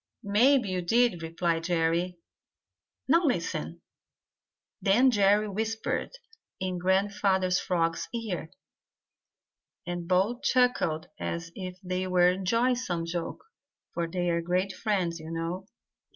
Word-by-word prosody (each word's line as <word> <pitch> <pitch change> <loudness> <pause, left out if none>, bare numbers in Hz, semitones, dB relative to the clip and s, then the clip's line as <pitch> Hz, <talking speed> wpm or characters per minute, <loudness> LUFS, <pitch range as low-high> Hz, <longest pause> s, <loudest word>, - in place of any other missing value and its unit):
"Maybe 230 +3 +4
you 185 -1 -1
did," 230 0 +2
replied 165 0 -1
Jerry. 170 +1 0 0.9
"Now 335 +6 +4
listen." 280 -6 -1 1.0
Then 240 +7 +5
Jerry 205 0 +3
whispered 220 +2 -2 0.5
in 185 -1 -2
Grandfather 190 0 +1
Frog's 165 -2 0
ear, 215 -9 -4 1.4
and 175 -1 -4
both 195 +7 +1
chuckled 210 -11 +2
as 170 0 -4
if 185 -1 -6
they 185 0 -2
were 180 -1 +4
enjoying 230 +7 +1
some 175 -9 -2
joke, 170 0 -4 0.5
for 170 -1 -1
they 175 0 0
are 170 0 +1
great 180 +3 0
friends, 185 -6 -1
you 160 0 -9
know. 165 +3 -4
185 Hz, 115 wpm, -28 LUFS, 170-210 Hz, 1.4 s, Then